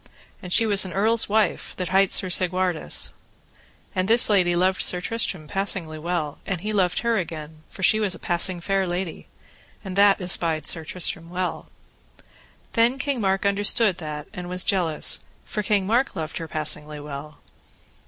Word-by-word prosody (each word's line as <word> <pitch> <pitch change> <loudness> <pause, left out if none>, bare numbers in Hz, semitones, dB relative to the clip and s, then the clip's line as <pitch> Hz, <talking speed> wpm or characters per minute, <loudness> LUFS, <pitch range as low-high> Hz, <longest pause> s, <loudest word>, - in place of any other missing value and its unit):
And 180 - -9
she 225 - +5
was 205 -2 +5
an 185 - -5
earl's 220 +3 +2
wife 215 0 0
that 180 -2 -4
hight 195 +1 +3
Sir 190 - +4
Segwarides. 180 -2 0 0.8
And 185 -2 -1
this 230 0 +5
lady 180 -4 +3
loved 185 +2 +1
Sir 180 - +2
Tristram 185 -5 -3
passingly 185 -4 -1
well. 165 -3 -3
And 180 -4 -4
he 215 +2 -3
loved 180 -3 +1
her 235 -2 +1
again, 155 -2 -7
for 190 - -9
she 215 - +5
was 200 -4 0
a - - -9
passing 175 +1 0
fair 195 +1 0
lady, 175 -1 -4 0.6
and 190 -1 -5
that 200 0 +5
espied 165 -4 +1
Sir 165 - 0
Tristram 165 0 -3
well. 180 -1 -3 1.1
Then 235 +3 +3
King 270 -2 -2
Mark 195 0 0
understood 200 0 +2
that 150 -2 -6
and 180 0 -7
was 180 0 +1
jealous, 175 -5 0 0.3
for 210 - -3
King 205 -2 +1
Mark 240 +7 +1
loved 160 0 -4
her 165 - -6
passingly 150 -1 0
well. 145 +1 -8
185 Hz, 170 wpm, -24 LUFS, 165-200 Hz, 1.1 s, she